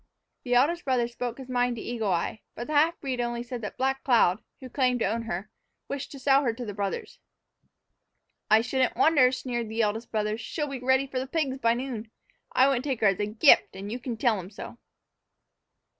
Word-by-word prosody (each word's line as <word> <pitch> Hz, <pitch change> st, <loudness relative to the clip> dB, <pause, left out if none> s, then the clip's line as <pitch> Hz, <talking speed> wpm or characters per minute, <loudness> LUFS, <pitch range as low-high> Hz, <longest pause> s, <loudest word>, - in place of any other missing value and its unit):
The 245 Hz, -1 st, 0 dB
eldest 330 Hz, +8 st, +3 dB
brother 250 Hz, -3 st, +1 dB
spoke 240 Hz, 0 st, -5 dB
his 265 Hz, -2 st, -9 dB
mind 245 Hz, -1 st, 0 dB
to 225 Hz, -, -7 dB
Eagle 225 Hz, -4 st, -2 dB
Eye, 180 Hz, +5 st, -1 dB
but 240 Hz, -, -5 dB
the 305 Hz, -, -5 dB
half 320 Hz, +3 st, +3 dB
breed 260 Hz, -3 st, -2 dB
only 240 Hz, 0 st, -2 dB
said 245 Hz, -1 st, -6 dB
that 210 Hz, -, -6 dB
Black 270 Hz, +1 st, 0 dB
Cloud, 225 Hz, -6 st, +3 dB, 0.2 s
who 260 Hz, -, -9 dB
claimed 250 Hz, -1 st, +1 dB
to -, -, +3 dB
own 225 Hz, +4 st, -1 dB
her, 210 Hz, -1 st, -5 dB, 0.4 s
wished 280 Hz, -1 st, -5 dB
to -, -, -8 dB
sell 270 Hz, +1 st, +4 dB
her 240 Hz, -5 st, 0 dB
to 245 Hz, +1 st, -6 dB
the 205 Hz, -, -5 dB
brothers. 200 Hz, -1 st, -4 dB, 1.3 s
"I 215 Hz, +1 st, +6 dB
shouldn't 255 Hz, +2 st, 0 dB
wonder," 285 Hz, -6 st, +5 dB
sneered 240 Hz, -3 st, -3 dB
the 225 Hz, +1 st, 0 dB
eldest 220 Hz, +2 st, -2 dB
brother; 215 Hz, 0 st, -1 dB
"she'll 295 Hz, +6 st, -3 dB
be 275 Hz, -2 st, -5 dB
ready 260 Hz, +2 st, +2 dB
for 265 Hz, -1 st, -3 dB
the 260 Hz, -, -4 dB
pigs 270 Hz, -3 st, -1 dB
by 230 Hz, -2 st, +3 dB
noon. 240 Hz, -3 st, -5 dB, 0.4 s
I 260 Hz, -, +5 dB
wouldn't 260 Hz, -3 st, +1 dB
take 270 Hz, -5 st, -2 dB
her 215 Hz, -, +5 dB
as 195 Hz, -, -1 dB
a 205 Hz, -, 0 dB
gift, 220 Hz, +3 st, +5 dB
and 200 Hz, +2 st, -6 dB
you 245 Hz, -, -4 dB
can 240 Hz, -2 st, -5 dB
tell 220 Hz, -3 st, +2 dB
'em 185 Hz, 0 st, -8 dB
so." 220 Hz, +3 st, -10 dB
245 Hz, 220 wpm, -27 LUFS, 225-265 Hz, 1.3 s, I